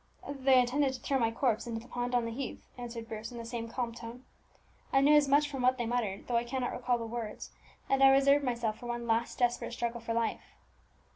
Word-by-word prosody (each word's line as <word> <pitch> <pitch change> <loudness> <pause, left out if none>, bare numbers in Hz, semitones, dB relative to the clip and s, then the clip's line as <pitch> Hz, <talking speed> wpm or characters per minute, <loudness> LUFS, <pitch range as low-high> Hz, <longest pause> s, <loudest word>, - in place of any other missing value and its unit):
"They 270 -2 +3
intended 265 +2 +2
to 255 - -6
throw 270 +2 0
my 230 -2 +2
corpse 230 0 0
into 230 -1 -3
the 235 - -14
pond 245 0 -2
on 240 -1 +2
the 230 - -3
heath," 255 +3 -6
answered 235 -2 -7
Bruce 220 +1 -6
in 240 - -8
the 230 - -6
same 230 -1 -5
calm 235 -1 -3
tone. 235 +2 -9 0.7
"I 270 - +4
knew 285 +2 +5
as 295 -1 +5
much 290 +2 +4
from 275 -3 -5
what 255 +1 +3
they 240 - -2
muttered, 225 -5 -2
though 240 - +1
I 235 - +1
cannot 250 +1 -2
recall 245 -1 0
the 230 - -5
words; 225 -2 -6 0.4
and 270 0 +2
I 270 - +9
reserved 275 +1 +5
myself 235 -4 -1
for 240 - -8
one 240 0 -3
last 230 +1 0
desperate 240 -1 0
struggle 235 0 -3
for 230 0 -3
life. 230 -1 -2
240 Hz, 235 wpm, -31 LUFS, 230-265 Hz, 0.7 s, I